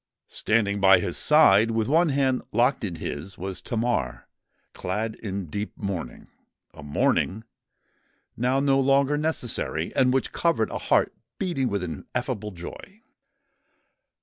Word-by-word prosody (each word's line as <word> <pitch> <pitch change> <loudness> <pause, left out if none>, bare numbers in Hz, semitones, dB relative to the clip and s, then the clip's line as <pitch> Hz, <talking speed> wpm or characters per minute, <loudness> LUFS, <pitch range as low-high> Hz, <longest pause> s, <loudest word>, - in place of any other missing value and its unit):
Standing 105 -2 +1
by 95 -1 +7
his 90 -1 -3
side, 115 -8 +5
with 115 -1 0
one 165 +4 +3
hand 135 -2 +1
locked 125 +4 +2
in 90 -5 -3
his, 80 +3 -6
was 95 0 -5
Tamar, 115 - -2 0.5
clad 110 +4 -3
in 100 -3 -5
deep 100 +6 -5
mourning—a 90 - -8
mourning 85 +8 0 0.9
now 125 +3 +1
no 135 -1 +3
longer 140 +1 +3
necessary, 125 - -2
and 130 -1 +4
which 135 0 0
covered 165 -10 0
a - - -3
heart - - +2 0.2
beating 165 -10 -1
with 100 -3 -2
ineffable 90 +5 -4
joy. 105 - -11
110 Hz, 125 wpm, -25 LUFS, 95-135 Hz, 0.9 s, by